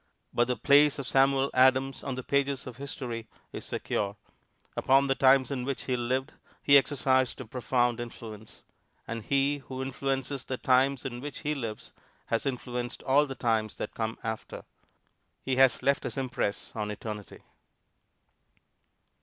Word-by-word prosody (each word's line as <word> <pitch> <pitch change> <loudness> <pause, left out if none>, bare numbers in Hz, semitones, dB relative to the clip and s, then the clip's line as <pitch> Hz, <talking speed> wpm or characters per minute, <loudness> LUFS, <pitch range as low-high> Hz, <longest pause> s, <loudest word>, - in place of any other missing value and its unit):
But 120 0 +2
the 125 - 0
place 145 +1 +5
of 140 - -4
Samuel 135 0 +3
Adams 130 +1 +3
on 135 -2 -3
the 130 - -5
pages 140 0 0
of 125 -3 -8
history 125 -5 -5 0.3
is - - -6
secure. 100 0 -2 0.6
Upon 135 +1 +4
the 135 - +2
times 135 0 +4
in 130 -3 -2
which 135 +1 -3
he 130 - 0
lived 130 +3 -1 0.3
he 140 - +6
exercised 130 -2 +3
a 130 - -6
profound 120 0 0
influence. 110 -2 -9 0.4
And 115 0 -4
he 140 +3 +1
who 130 -1 -8
influences 135 0 -2
the 130 - -4
times 130 +1 +2
in 120 -2 -5
which 145 +1 -6
he 150 - 0
lives 115 -7 -6 0.3
has 115 +4 -1
influenced 125 -1 -4
all 145 +2 +4
the 135 - -6
times 110 -4 0
that - - -5
come 110 0 -3
after; 110 -1 -5 0.8
he 130 -1 -1
has 135 -1 +4
left 140 0 +3
his - - -5
impress 125 -6 -2
on 105 -2 -2
eternity. 105 -1 -7
130 Hz, 155 wpm, -29 LUFS, 120-135 Hz, 0.8 s, he